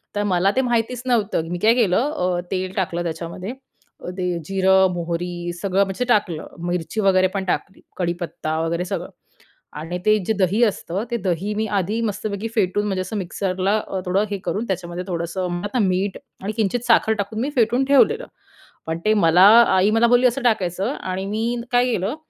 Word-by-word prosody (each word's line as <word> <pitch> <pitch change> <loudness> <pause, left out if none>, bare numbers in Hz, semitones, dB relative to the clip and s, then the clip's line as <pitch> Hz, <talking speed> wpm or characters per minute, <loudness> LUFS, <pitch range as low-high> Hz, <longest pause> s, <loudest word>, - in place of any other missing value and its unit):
तर 205 - 0
मला 190 0 +2
ते 265 - +3
माहितीच 240 0 -1
नव्हतं 215 -9 0
मी 175 - -2
काय 220 +3 +5
केलं 240 +5 +2
अ, 180 -1 0
तेल 185 0 -2
टाकलं 175 -2 -1
त्याच्यामध्ये, 170 +4 -5
अ, 260 -8 -14
ते 180 -2 -1
जिरं, 190 0 +4
मोहरी 175 0 -3
सगळं 195 0 +2
म्हणजे 195 +6 -3
टाकलं, 175 -8 +1 0.2
मिरची 175 +4 -2
वगैरे 185 -2 +4
पण 195 - -1
टाकली, 190 +2 -3 0.2
कडीपत्ता 170 -3 -3
वगैरे 170 +2 -1
सगळं 180 -2 -4 0.7
आणि 165 +3 -5
ते 215 0 +4
जे 220 - +2
दही 200 +3 +1
असतं, 195 -3 -2
ते 235 - 0
दही 190 +4 -1
मी 220 +1 -1
आधी 205 +5 -1
मस्तपैकी 210 0 -3
फेटून 205 -1 +1
म्हणजे 190 -2 -1
असं 210 +4 -4
मिक्सरला 190 +2 -1 0.3
थोडं 195 +3 +2
हे 200 - -2
करून 215 - -2
त्याच्यामध्ये 180 -1 -4
थोडंसं 175 +1 -3
म 175 - -2
आता 210 +5 -2
मीठ 190 -1 0 0.3
आणि 205 - -2
किंचित 220 +2 0
साखर 225 -1 +4
टाकून 210 +2 -3
मी 270 +5 -1
फेटून 240 +3 +3
ठेवलेलं 285 - +3 0.6
पण 160 +1 -3
ते 215 - +4
मला 180 -3 +4 0.3
आई 190 +2 +4
मला 225 +1 +4
बोलली 245 +1 +5
असं 250 +3 -1
टाकायचं 195 -5 0
आणि 185 +1 -3
मी 230 +4 -2
काय 245 0 +4
केलं 200 +5 -1
195 Hz, 180 wpm, -21 LUFS, 180-220 Hz, 0.7 s, काय